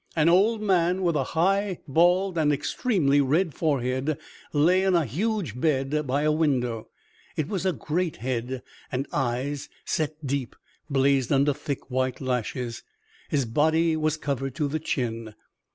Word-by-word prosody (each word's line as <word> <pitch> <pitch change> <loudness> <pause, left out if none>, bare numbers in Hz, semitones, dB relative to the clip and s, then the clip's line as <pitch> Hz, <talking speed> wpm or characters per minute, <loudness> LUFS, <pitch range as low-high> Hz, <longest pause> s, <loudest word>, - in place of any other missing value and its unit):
An 160 0 +4
old 210 +5 +3
man, 185 -1 +2
with 170 -3 +2
a 140 - +2
high, 195 +2 +2
bald 175 +5 +3
and 155 -3 +3
extremely 145 - +1
red 155 +5 +1
forehead 135 -1 0 0.3
lay 170 +6 +4
in 190 -1 +2
a 165 -3 +3
huge 165 - -2
bed 150 -1 +1
by 140 +3 +1
a 155 - +3
window. 125 -8 0 0.5
It 155 - 0
was 190 -1 -1
a - - +3
great 170 0 -2
head, 125 +1 -3 0.3
and 130 +2 -1
eyes, 135 +2 -2 0.2
set 155 -1 -2
deep, 135 -2 -2 0.3
blazed 135 -2 +2
under 140 +1 +3
thick, 140 -2 -5
white 130 0 0
lashes. 125 -2 -2 0.5
His 140 -3 +1
body 160 +7 +2
was 155 0 0
covered 135 -3 -3
to 145 +1 0
the 155 +3 -2
chin. 115 -7 -3
145 Hz, 150 wpm, -26 LUFS, 130-170 Hz, 0.5 s, An